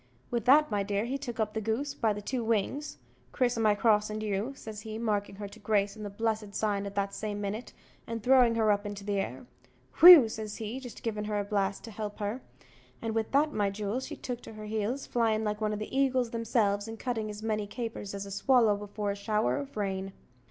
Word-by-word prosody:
With 235 -3 -1
that, 295 +1 +6
my 205 -1 +1
dear, 200 +2 -1
he 270 +3 -3
took 240 -4 -6
up 215 -1 0
the 220 - -2
goose 235 +7 -1
by 225 -5 +1
the 205 0 -4
two 245 +2 -2
wings 230 +7 -1 0.3
"Criss 245 -2 +1
o' 225 - -1
my 215 -2 +4
cross 210 -1 +3
an 215 0 -3
you," 210 +3 -1
says 215 -4 -8
he, 220 0 -6
markin' 210 -3 -1
her 205 0 -6
to 210 +3 -14
grace 205 -1 +1
with 215 - -11
the 205 - -4
blessed 215 0 -2
sign 200 -2 0
at 200 - -8
the 200 -1 +2
same 205 0 -4
minute 205 +4 -4 0.4
and 230 -2 -4
throwing 250 -2 +5
her 220 -2 +3
up 205 0 0
in 205 - -5
the 200 0 -2
air, - - -4 0.5
"whew," 335 -8 +11
says 215 -1 -5
he, 225 +3 -5
jist 245 -3 -10
givin' 215 -2 -2
her 210 0 -1
a - - 0
blast 200 -1 -1
to 230 - -8
help 210 0 -5
her; 210 +5 -3 0.6
and 225 -1 -3
with 225 -1 -1
that, 295 +2 +3
my 205 -1 +1
jewel, 205 +4 -2
she 265 - -6
took 245 -1 -5
to - - -10
her 215 0 -8
heels, 220 +5 -2
flyin' 225 -2 +1
like 210 0 -2
one 215 -1 +1
o' - - -1
the 215 +5 -6
eagles 260 -3 +2
themselves, 225 -3 +1
and 225 0 -7
cutting 225 -3 -2
as 210 +1 -7
many 215 -2 -1
capers 225 -3 -5
as 200 0 -5
a 200 - -9
swallow 220 +1 +4
before 205 0 -3
a - - -3
shower 210 +4 0
of 280 -4 -6
rain. 195 -1 -2
215 Hz, 235 wpm, -30 LUFS, 205-230 Hz, 0.6 s, whew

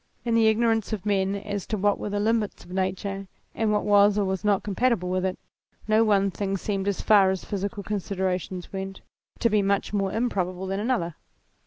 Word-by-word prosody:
In 235 - 0
the 225 -1 +5
igno 230 +2 +2
rance 225 -1 0
of 205 -2 -4
men 195 -1 +1
as 205 -1 -4
to 215 - -1
what 205 +1 +1
were - - -3
the 205 0 -1
limits 220 0 0
of 175 - -14
nature 190 +1 -2 0.3
and 220 -1 0
what 210 - +1
was 205 0 +5
or 205 - +2
was 190 0 -2
not 205 -2 +2
compatible 205 -2 0
with 185 0 0
it, 185 -1 -1 0.5
no 215 +1 +4
one 200 -2 +3
thing 195 +1 -2
seemed, 195 0 -2
as 200 - -1
far 200 -3 +5
as 190 -1 -2
physical 200 +1 -3
considerations 190 -2 -3
went, 195 0 -5 0.4
to 235 - +2
be 210 -2 +3
much 200 +1 0
more 195 -2 0
improbable 190 -6 -1
than 195 +1 -2
another. 205 -8 -1
200 Hz, 205 wpm, -26 LUFS, 190-210 Hz, 0.5 s, the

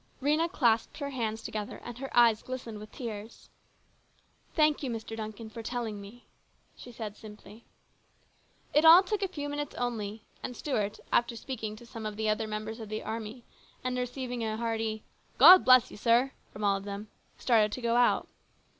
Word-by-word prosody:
Rhena 305 +5 +1
clasped 230 -7 +1
her 280 -2 -4
hands 225 -4 -3
together, 210 -1 -5
and 240 0 -8
her 270 0 -5
eyes 230 -2 +6
glistened 245 -4 -6
with 215 0 -11
tears. 220 -3 -8 0.5
" - - -37
Thank 305 -2 +3
you, 270 - -3
Mr. 225 -1 -5
Duncan, 220 0 -6
for 220 +1 -8
telling 225 -3 -4
me," 215 +5 -13 0.5
she 245 - -11
said 215 -3 -6
simply. 215 +1 -13 1.1
It 300 - +4
all 330 +4 +9
took 415 +1 -2
a 390 - +1
few 295 -6 -5
minutes 290 0 -4
only, 220 -3 -3 0.2
and 250 - -6
Stuart, 215 -7 -2
after 235 0 +2
speaking 225 -3 -5
'to 240 - -13
some 225 -2 -6
of 210 - -6
the 220 0 0
other 215 +1 0
members 215 +1 -5
of 220 -2 -8
the 215 0 -4
army 225 +2 -6 0.4
and 255 0 -1
receiving 250 -1 -3
a 220 -1 -2
hearty 225 -1 -2 0.2
" - - -36
God 360 +8 +10
bless 255 -1 +6
you, - - -10
sir," 240 +5 +3 0.2
from 210 - -8
all 200 -1 +3
of 195 - -8
them, 200 +1 -6 0.3
started 220 -4 +3
to 255 - -5
go 235 0 +1
out. 245 0 +3
230 Hz, 190 wpm, -29 LUFS, 215-255 Hz, 1.1 s, God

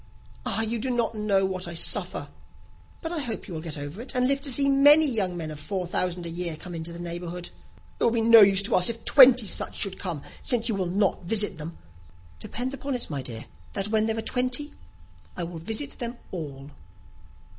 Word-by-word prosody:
"Ah, 220 - 0
you 225 +1 -1
do 260 +4 -3
not 240 -2 0
know 205 -3 +1
what 185 -1 -3
I 170 - -5
suffer." 175 -5 0 0.7
"But 325 - -4
I 340 - -2
hope 240 -6 -5
you 185 - -8
will 160 - -5
get 160 -2 -6
over 145 +8 -7
it, 260 +2 -9
and 250 0 +2
live 275 +1 0
to 280 -1 0
see 275 +2 +3
many 290 +3 +7
young 195 -9 0
men 160 -2 -5
of 150 - -8
four 185 +3 -3
thousand 175 0 0
a - - -3
year 170 -1 -4
come 175 +2 -9
into 165 0 -5
the 170 - -8
neighbourhood." 175 0 -6 0.5
"It - - -1
will - - +5
be 230 0 0
no 230 0 +8
use 195 -1 +5
to - - 0
us, 180 +3 +4
if 230 0 -6
twenty 255 -4 +7
such - - -1
should 195 -2 -1
come, 170 -7 -4 0.2
since 235 -3 +2
you 230 - 0
will 190 -3 -1
not 190 0 0
visit 205 -2 +1
them." 165 +2 -8 0.6
"Depend 250 - -4
upon 275 0 -4
it, 240 - -4
my 140 -2 -3
dear, 115 -3 -7 0.3
that 200 0 -2
when 220 0 +2
there 225 0 -1
are 225 - -3
twenty, 255 +4 -1 0.6
I 175 - -2
will 170 -1 -6
visit 225 - -2
them 240 -1 -5
all." 145 -5 -7
200 Hz, 220 wpm, -26 LUFS, 170-240 Hz, 0.7 s, no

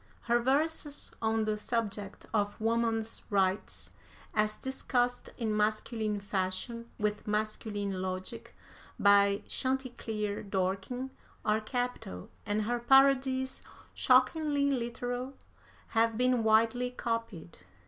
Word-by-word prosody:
Her 240 0 +2
verses 290 +3 0
on 220 -1 +1
the 215 0 0
subject 210 -3 -3
of 205 -1 0
Woman's 225 0 0
Rights, 195 -1 0 0.4
as 215 0 +1
discussed 245 -2 -1
in 220 -3 -1
masculine 215 0 0
fashion, 200 +4 -3
with 210 0 -1
masculine 210 -2 -2
logic, 185 +5 -5 0.4
by 200 0 +5
Chanticleer 235 -6 -2
Dorking, 195 +7 -2 0.3
are 215 +1 +2
capital, 245 - -4 0.2
and 210 +1 +1
her 240 +3 0
parodies, 265 +1 +4 0.3
shockingly 280 +2 +3
literal, 245 +1 -3 0.5
have 225 -1 +2
been 250 -1 +3
widely 225 +3 +3
copied. 230 -9 -4
225 Hz, 100 wpm, -31 LUFS, 210-250 Hz, 0.5 s, by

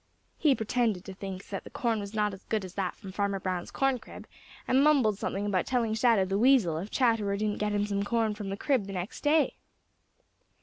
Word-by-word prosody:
He 290 -4 +4
pretended 220 -4 0
to 190 - -7
think 195 0 -7
that 195 - -4
the - - -10
corn 230 -3 -1
was 200 +1 -7
not 210 -1 +1
as 195 - -11
good 215 -3 -1
as 180 - -10
that 190 -2 -2
from 195 -3 -10
Farmer 200 0 -1
Brown's 185 -2 -3
corn 270 -2 +1
crib - - -11 0.4
and 265 +2 +4
mumbled 260 -9 +3
something 200 +1 -2
about 195 -3 0
telling 235 -4 +1
Shadow 225 -4 +3
the 195 +1 -1
Weasel 225 -11 +4
if 195 +5 -6
Chatterer 225 -6 +1
didn't 210 0 -1
get 210 0 0
him 205 0 +1
some 200 -1 -1
corn 220 +1 0
from 205 -2 -6
the 195 - -3
crib 250 -5 0
the 195 - -6
next 185 +4 -5
day. 300 0 +2
210 Hz, 220 wpm, -29 LUFS, 195-235 Hz, 0.4 s, He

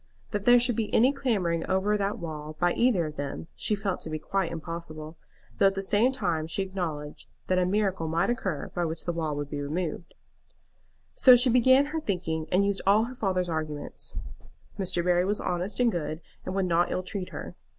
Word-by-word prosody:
That 205 -2 -2
there 245 0 +7
should 245 -1 +2
be 220 -2 -2
any 255 +5 +5
clambering 195 -12 0
over 195 +3 +2
that 200 0 -1
wall 155 -2 -6
by 175 0 +3
either 230 -9 +2
of 155 0 -7
them 145 +3 -5
she 210 - 0
felt 200 -2 -3
to - - -5
be 155 - -2
quite 190 +3 -1
impossible, 160 -1 -6 0.4
though 195 - +6
at 195 - +1
the 195 - -2
same 210 +6 +3
time 165 -11 -1
she 195 +4 -1
acknowledged 165 -6 -5 0.2
that 185 0 +2
a 180 - +2
miracle 190 -4 0
might 165 +8 +1
occur 190 -11 -3
by 175 - -1
which 160 0 -3
the 175 - -1
wall 160 -3 -2
would 145 0 -5
be 145 -1 -3
removed, 160 +3 -4 1.0
So 255 - +8
she 245 +1 +4
began 260 +3 +5
her 320 - -1
thinking, 165 - -2
and 195 +2 +3
used 200 -1 0
all 205 +3 +5
her 245 +2 -5
father's 190 -7 -1
arguments. 155 -3 -5 0.6
Mr. 185 -2 0
Barry 180 0 +3
was 205 +3 0
honest 180 +5 -2
and 245 -2 +4
good, 155 -3 -3 0.3
and 185 - -3
would 195 -1 +1
not 175 0 +2
ill 185 - -1
treat 185 -1 -4
her. - - -7
180 Hz, 205 wpm, -27 LUFS, 160-205 Hz, 1.0 s, So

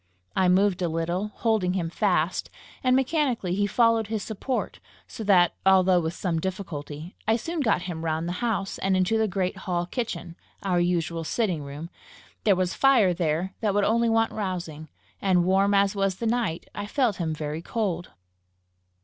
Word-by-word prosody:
I 185 -1 +3
moved 190 0 +3
a 175 - +1
little, 170 +5 -1
holding 210 -4 0
him 170 -3 -2
fast, 180 -4 0 0.3
and 255 0 +4
mechanically 265 - +1
he 205 +2 +1
followed 230 0 +3
his 220 -1 -3
support; 240 +4 -3 0.3
so 225 - -8
that, 180 -4 +5
although 185 -1 +5
with 165 0 -3
some 170 -4 -1
difficulty, 160 -3 -5
I 220 - +4
soon 330 +8 -3
got 215 -10 +1
him 165 -3 -5
round 160 +1 -1
the - - -2
house, 215 -5 -1
and 190 -1 +1
into 185 +5 +2
the 220 - +2
great 185 -1 -2
hall 175 -2 -2
kitchen, 175 -6 -4 0.3
our 185 -3 +1
usual 170 -1 0
sitting 180 -2 -1
room; 145 +4 -8 0.5
there 205 -3 +5
was 185 0 0
fire 245 -9 +4
there 170 +2 -1
that 210 -3 +1
would 205 -1 +3
only 230 +2 +2
want 225 0 +2
rousing, 175 -7 -4 0.3
and, 180 -3 +3
warm 195 +2 +3
as 200 +1 +3
was 195 -1 +1
the 230 - -5
night, 225 -8 -1
I 205 0 -5
felt 240 -4 +1
him 165 -3 -2
very 150 +1 -4
cold. 180 -4 -2
190 Hz, 175 wpm, -26 LUFS, 175-220 Hz, 0.5 s, that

